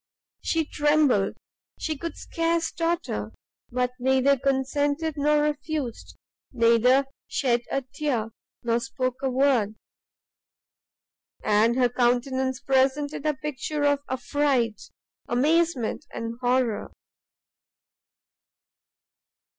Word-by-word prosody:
She 325 -1 +1
trembled, 295 -10 +2 0.4
she 315 - -2
could 335 +4 -6
scarce 330 0 -1
totter, 325 - -2 0.4
but 250 0 0
neither 265 +2 +3
consented 285 +4 0
nor 295 0 +3
refused, 295 -4 -3 0.3
neither 245 +3 +4 0.2
shed 240 -3 +1
a 275 - -1
tear, 255 -4 -2 0.3
nor 235 0 +1
spoke 255 +2 -3
a 270 - 0
word, 250 -5 +2 1.7
and 215 +3 +3
her 250 -1 +4
countenance 250 +2 0
presented 275 +3 +1
a 300 - +1
picture 295 +1 -3
of 285 -1 +3
affright, 260 -3 0 0.5
amazement, 290 0 +1
and 230 0 -4
horror. 245 -3 +1
265 Hz, 90 wpm, -26 LUFS, 245-295 Hz, 1.7 s, neither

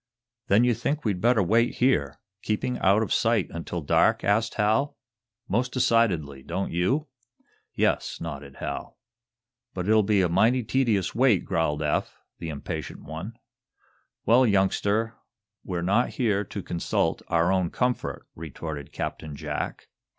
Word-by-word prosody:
"Then 105 +4 +5
you 125 0 +4
think 145 +5 -2
we'd 100 -4 0
better 115 -3 +4
wait 115 +6 +2
here, 75 - +1 0.2
keeping 110 +4 -2
out 100 +3 +4
of - - -1
sight, 115 -4 +2
until 85 +1 -5
dark?" 70 - +3
asked 110 +3 +1
Hal. 110 +7 +1 0.5
"Most 125 +6 0
decidedly. 95 - +1
Don't 95 +8 -3
you?" 120 - +1 0.7
"Yes," - - 0
nodded 70 -4 -7
Hal. - - -6 0.8
"But 90 0 -3
it'll 110 0 +5
be 100 -1 +2
a - - +3
mighty 115 +9 +3
tedious 110 -6 +1
wait," 120 -6 +3
growled 80 -2 0
Eph, 75 - -1 0.2
the 85 - -5
impatient 70 -2 -6
one. 80 +9 -7 0.9
"Well, 120 +4 +5
youngster, 105 +2 +1 0.5
we're 85 -2 -3
not 100 +7 +2
here 105 -5 0
to 100 - -6
consult 85 - -1
our 85 +2 +2
own 95 -2 +1
comfort," 125 +5 -2
retorted 75 -2 -7
Captain 75 -2 -5
Jack. - - -4
100 Hz, 140 wpm, -26 LUFS, 85-115 Hz, 0.9 s, Then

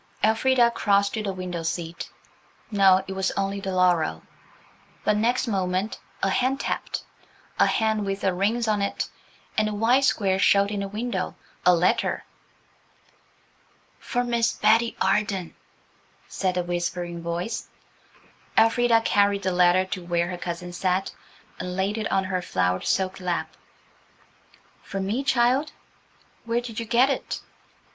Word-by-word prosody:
Elfrida 235 +2 +4
crossed 200 -3 +2
to 220 - -2
the 200 -2 -2
window 180 -2 -5
seat. 165 0 -4 0.6
No, 190 -2 +5
it 190 - -4
was 190 0 0
only 195 0 -1
the 195 -1 -4
laurel. 175 - +2 0.8
But 210 - +2
next 235 +4 +1
moment 190 0 -1 0.2
a 195 - +3
hand 260 +6 +1
tapped–a - - -3
hand 220 -1 +1
with 195 0 -3
rings 200 +5 +1
on 210 -2 +1
it, 200 - -1 0.5
and 215 0 +2
a 210 - -4
white 240 +6 +3
square 195 -7 +2
showed 200 +2 +4
in 205 - -2
the 200 - -2
window–a 195 -4 -1
letter. 175 +2 +1 1.8
"For 245 -1 -1
Miss 235 -1 +1
Betty 225 +2 +2
Arden," 195 -2 0 0.7
said 185 -2 -2
a 180 - +1
whispering 175 0 -3
voice. 170 +6 -3 0.9
Elfrida 230 +1 +4
carried 200 -2 +2
the 185 - +1
letter 180 +1 +4
to 185 -1 -5
where 175 0 0
her 180 - -4
cousin 175 0 -5
sat, 185 +1 0 0.5
and 180 0 -4
laid 195 +3 -1
it 220 - -3
on 195 0 +2
her 185 -1 -2
flowered 90 - 0
silk 190 0 0
lap. 180 -2 -3 1.3
"For 195 - -5
me, 210 +8 -1
child? 265 +3 +2 0.7
Where 230 +1 +1
did 235 -2 -6
you 230 - -5
get 250 +4 +4
it?" - - -3
195 Hz, 140 wpm, -25 LUFS, 180-225 Hz, 1.8 s, No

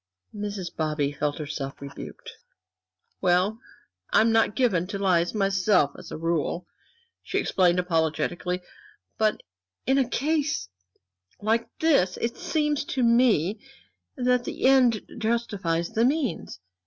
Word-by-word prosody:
Mrs. 205 -4 -5
Bobby 150 -3 0
felt 145 0 -2
herself 140 -2 -5
rebuked. 140 0 -9 0.9
"Well, 185 +5 +2 0.5
I - - +5
am 225 +1 +3
not 225 -1 +3
given 195 -10 +2
to 200 +1 -4
lies 180 -2 +1
myself, 195 -6 +3
as - - -11
a - - -5
rule," 165 +1 -1 0.6
she - - -3
explained, 180 -2 +2
apologetically, 180 +1 -1 0.6
"but 215 -1 +1 0.4
in 265 +1 +3
a 260 -2 +1
case 290 - 0 0.7
like 225 +2 0
this 275 - +2
it 230 0 -2
seems 300 -5 0
to 260 - -1
me 230 -5 +3 0.6
that 250 -1 +2
the - - -4
end 255 -5 +5 0.2
justifies 205 -7 -1
the 225 - +1
means. 260 - -1
200 Hz, 125 wpm, -26 LUFS, 170-240 Hz, 0.9 s, I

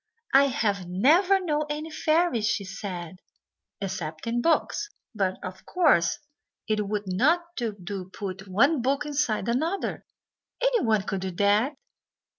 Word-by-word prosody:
"I 275 +1 +7
have 205 -8 -1
never 335 - +4
known 305 -4 -1
any 305 +2 -4
fairies," 310 -8 +1
she 215 -3 0
said, 185 -3 -6 0.6
"except 170 -5 -5
in 235 +1 0
books; 335 +7 +1 0.2
but, 190 -3 0
of 185 0 -7
course, 300 - +3 0.5
it 210 -2 0
would 210 0 -2
not 325 - +1
do 230 -4 -2
to 190 -1 -5
put 195 0 -6
one 265 - +3
book 275 +4 0
inside 285 -8 0
another 315 +11 -1 0.6
anyone 430 - +2
could 195 -2 -3
do 190 - -2
that." 205 - +2
225 Hz, 135 wpm, -26 LUFS, 195-300 Hz, 0.6 s, I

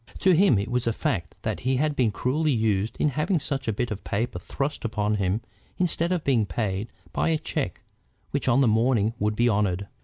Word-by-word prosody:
To 190 - +5
him 180 - +5
it 100 +4 -2
was 125 -1 0
a 115 - +2
fact 85 -6 -2
that - - -2
he 130 +1 0
had 150 +2 +1
been 125 -5 +3
cruelly 135 +9 0
used 110 -3 0
in 150 - +2
having 155 +6 0
such 140 -2 -3
a - - +2
bit 120 +3 -2
of 105 - -5
paper 105 -3 -2
thrust 135 - -3
upon 105 -2 0
him 100 +2 0 0.4
instead 170 -1 +1
of 175 -4 0
being 120 -7 +2
paid 100 +3 -2 0.2
by - - +1
a 160 - +2
check 145 - -3 0.5
which - - -1
on 130 +2 +4
the 130 - +4
morning 110 0 +2
would 105 +1 0
be 120 +2 +3
honored. 100 -4 +1
115 Hz, 215 wpm, -26 LUFS, 105-140 Hz, 0.5 s, To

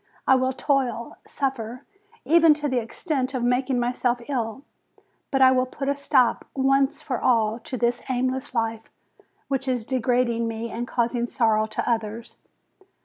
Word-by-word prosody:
I - - +5
will 260 0 +2
toil, 255 -4 -1
suffer, 255 -2 -3 0.4
even 330 -1 +6
to 295 0 -3
the 255 -3 +1
extent 265 +2 -3
of 250 - -1
making 250 +1 +1
myself 245 0 0
ill; 250 -2 -3 0.7
but 270 -1 +3
I 260 - +7
will 255 0 +2
put 275 +2 -5
a - - +3
stop, 265 -4 +2
once 270 0 +2
for 255 -4 -4
all, 225 -2 +2
to 255 +2 -6
this 240 0 0
aimless 255 0 -2
life, 225 -1 -2 0.6
which 270 -1 -2
is 250 -4 -1
degrading 245 -2 +1
me 225 0 -4
and 240 +1 -4
causing 235 0 0
sorrow 220 -4 +2
to - - -4
others. 225 0 -3
250 Hz, 155 wpm, -24 LUFS, 235-265 Hz, 0.7 s, I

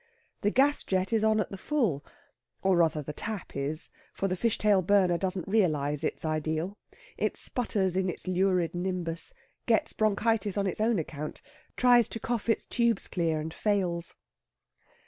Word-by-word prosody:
The 205 - +2
gas 280 +6 +3
jet 190 +3 -1
is 220 -1 +2
on 220 0 +3
at 210 - -2
the 195 - -7
full 220 - 0 0.6
or 190 -2 +3
rather 160 -3 +2
the 150 - -6
tap 215 +3 -6
is, 140 +3 -2 0.2
for 195 - -1
the 185 - -1
fish 230 +4 0
tail 205 -3 +3
burner 185 -1 +3
doesn't 185 0 -2
realise 155 -8 +1
its 160 - -2
ideal. 155 +5 -2 0.4
It - - -1
sputters 195 -7 +1
in 190 0 +1
its 180 - -5
lurid 185 -2 +1
nimbus 175 - -2 0.3
gets - - +2
bronchitis 215 -1 +1
on 200 - +1
its 190 +2 -1
own 225 0 +2
account, 150 -2 -5 0.3
tries 245 -2 +5
to 225 - -5
cough 235 0 -3
its 225 - +1
tubes 235 -1 +1
clear 165 -3 0
and 160 +1 -5
fails. 180 -5 -1
190 Hz, 165 wpm, -29 LUFS, 165-215 Hz, 0.6 s, tries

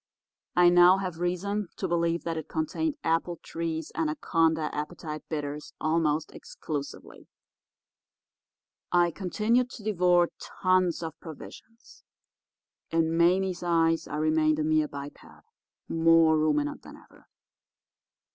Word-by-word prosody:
I 175 0 +6
now 175 +1 +6
have 185 -4 -4
reason 190 +3 -2
to 190 - -2
believe 170 -1 0
that 165 -1 -3
it 160 -1 -5
contained 285 - -2
Appletree's 165 -1 -2
Anaconda 165 - 0
Appetite 155 0 -5
Bitters 150 -1 -5
almost 155 -1 0
exclusively. 145 -3 -7 1.6
I 175 -1 +3
continued 220 +7 0
to 230 - -11
devour 180 -4 +3
tons 185 -2 0
of 160 -1 -7
provisions. 220 +7 -13 0.9
In 165 0 +1
Mame's 180 +2 +2
eyes 165 -2 +1
I - - -5
remained 155 0 +2
a 155 - 0
mere 155 0 +2
biped, 140 0 -8 0.7
more 165 -1 +4
ruminant 150 -1 0
than - - -13
ever. - - -21
165 Hz, 110 wpm, -27 LUFS, 155-180 Hz, 1.6 s, I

